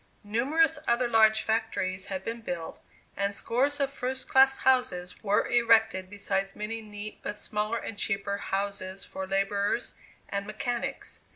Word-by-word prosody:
Numerous 275 +9 +2
other 240 +1 +3
large 220 -1 +5
factories 200 -4 -1
had 190 -1 -4
been 230 +1 -4
built, 170 -6 -5 0.3
and 200 +1 0
scores 275 +7 0
of 275 -1 0
first 260 0 -4
class 265 0 +5
houses 180 -9 +1
were 205 -1 +2
erected, 225 -5 +3
besides 195 -1 -2
many 220 +2 -4
neat, 210 0 -8
but 210 - -4
smaller 215 +2 -1
and 205 -3 -6
cheaper 200 -1 -1
houses 195 -1 -3
for 190 0 -6
laborers 200 +1 0 0.3
and 200 0 -3
mechanics. 235 +3 -3
215 Hz, 145 wpm, -28 LUFS, 200-235 Hz, 0.3 s, large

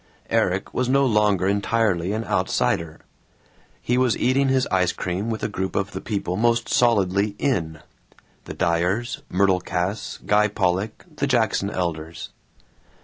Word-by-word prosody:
Erik - - 0
was 125 0 0
no 140 +1 +4
longer 105 -5 +2
entirely 100 -3 +1
an 110 +2 -2
outsider. 90 -4 -1 0.8
He 125 +1 +1
was 125 -3 +2
eating 135 +2 +2
his 130 -1 +2
ice 90 -2 +2
cream 95 +5 -3
with 110 -1 -3
a - - +1
group 95 -2 -4
of 100 +1 -1
the 95 - -6
people 100 -4 -3
most 115 +2 +1
solidly 100 -3 +2
"in" 80 - -1 0.6
the - - -7
Dyers, 90 +8 0
Myrtle 95 0 +2
Cass, 90 +4 -3
Guy 105 +1 +4
Pollock, 100 0 -1
the 140 - 0
Jackson 110 -6 +1
Elders. 85 -3 -4
100 Hz, 145 wpm, -23 LUFS, 90-115 Hz, 0.8 s, no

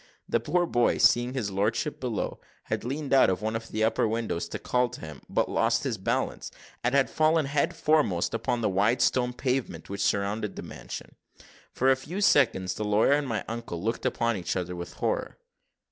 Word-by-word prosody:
The - - +2
poor 175 +9 +1
boy, 120 -7 +2
seeing 120 +2 +4
his 110 -7 -2
lordship 100 +2 -1
below, - - -3 0.2
had - - -3
leaned 140 +3 -3
out 135 - +6
of 95 +2 -1
one 110 +1 -1
of 115 0 -4
the 110 0 -1
upper 110 0 +2
windows 110 -5 -2
to - - -4
call 125 0 +1
to 125 - -9
him, 75 -3 -9
but - - +1
lost - - +1
his - - -2
balance, - - -2 0.3
and 125 +3 +1
had 140 -1 +4
fallen 155 0 +2
head 140 +1 0
foremost 150 - +2
upon 120 +1 -1
the - - +2
wide 105 +6 +2
stone 125 -1 +2
pavement 125 - -2
which 100 0 -3
surrounded 100 +2 0
the - - -6
mansion. - - -8 0.6
For 130 +1 +3
a - - +5
few 150 +9 -6
seconds, 115 - +3
the 105 - -4
lawyer 105 +4 +3
and 145 -1 +1
my 110 -5 -2
uncle 115 -7 -5
looked 115 +2 -1
upon 115 -1 0
each 90 - -3
other 90 -1 -3
with 85 0 -7
horror. - - -2
115 Hz, 200 wpm, -27 LUFS, 100-130 Hz, 0.6 s, out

